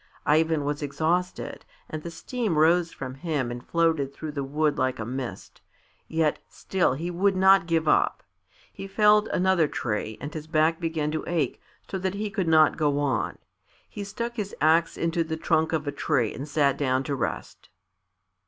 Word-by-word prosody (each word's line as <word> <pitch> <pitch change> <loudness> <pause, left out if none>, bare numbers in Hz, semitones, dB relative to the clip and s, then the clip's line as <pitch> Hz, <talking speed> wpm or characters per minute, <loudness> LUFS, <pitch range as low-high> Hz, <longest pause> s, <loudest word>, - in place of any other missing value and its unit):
Ivan 155 0 +2
was 145 +1 -2
exhausted, 165 +5 -2 0.2
and 155 - -5
the 170 - -6
steam 220 - -3
rose 165 +2 +4
from 130 -1 -6
him 140 -4 -2
and 120 0 -6
floated 160 -4 +1
through 155 +2 -6
the 140 -2 -3
wood 150 +2 0
like 130 -1 0
a 110 - -4
mist; 130 +1 -6 0.5
yet 160 -2 +1
still 185 -8 0
he 165 +6 -4
would 190 +3 +2
not 190 -2 +5
give 165 -2 +1
up. - - +2 0.5
He 195 - -7
felled 210 +1 +4
another 185 -3 +2
tree 110 -4 -3
and 145 +2 -6
his 155 -1 -6
back 160 +1 +2
began 160 -3 -1
to 155 - -2
ache 170 -2 -1 0.3
so 190 - -4
that 190 +1 -2
he 210 0 -3
could 190 -3 -1
not 155 -1 +5
go 145 -2 +1
on. 145 -2 -1 0.5
He 205 - -7
stuck 235 +4 -5
his 205 -2 -4
axe 165 +2 +3
into 165 0 0
the 160 0 -4
trunk 160 0 +1
of 155 -2 -1
a 145 - -1
tree 120 -5 0
and 140 +5 -7
sat 145 -2 +2
down 130 -2 +1
to 140 0 -2
rest. 115 -4 -5
160 Hz, 180 wpm, -26 LUFS, 145-175 Hz, 0.5 s, not